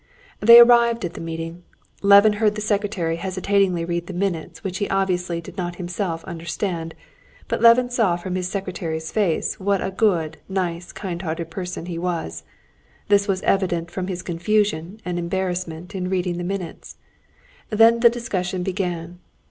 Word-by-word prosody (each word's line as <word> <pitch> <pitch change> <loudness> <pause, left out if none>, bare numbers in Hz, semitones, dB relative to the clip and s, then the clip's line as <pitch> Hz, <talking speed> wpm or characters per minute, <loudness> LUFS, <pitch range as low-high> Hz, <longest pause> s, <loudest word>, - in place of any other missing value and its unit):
They 235 +2 +9
arrived 235 -2 +6
at 175 - -5
the - - -8
meeting. 165 +1 -6 0.4
Levin 200 +1 +7
heard 210 -1 +3
the 210 - -4
secretary 200 -5 -1
hesitatingly 185 -1 0
read 170 0 -3
the 190 - -6
minutes 180 -2 -3
which 190 -2 -4
he 205 - -1
obviously 180 -3 0
did 170 - -12
not 175 -1 -3
himself 175 -1 -4
understand; 170 -1 -4 0.5
but - - -2
Levin 240 +2 +6
saw 225 -8 +2
from 180 +1 -5
this 180 0 -2
secretary's 170 -5 -4
face 200 -2 0
what 200 0 +1
a 190 - -3
good, 175 -6 0
nice, 180 -2 -3
kind 175 -4 -5
hearted 165 -1 -4
person 180 -1 -5
he 170 -2 -5
was. 170 - -3 0.7
This 200 0 +4
was 190 -2 -1
evident 175 -3 0
from 185 0 -4
his 180 -1 -4
confusion 180 +1 0
and 175 -1 -2
embarrassment 180 0 -3
in 185 -2 -3
reading 180 -2 -1
the - - -3
minutes. 180 -2 -6 0.7
Then 225 +2 +5
the 235 0 +7
discussion 190 -6 -3
began. 180 -2 -3
180 Hz, 160 wpm, -22 LUFS, 170-200 Hz, 0.7 s, They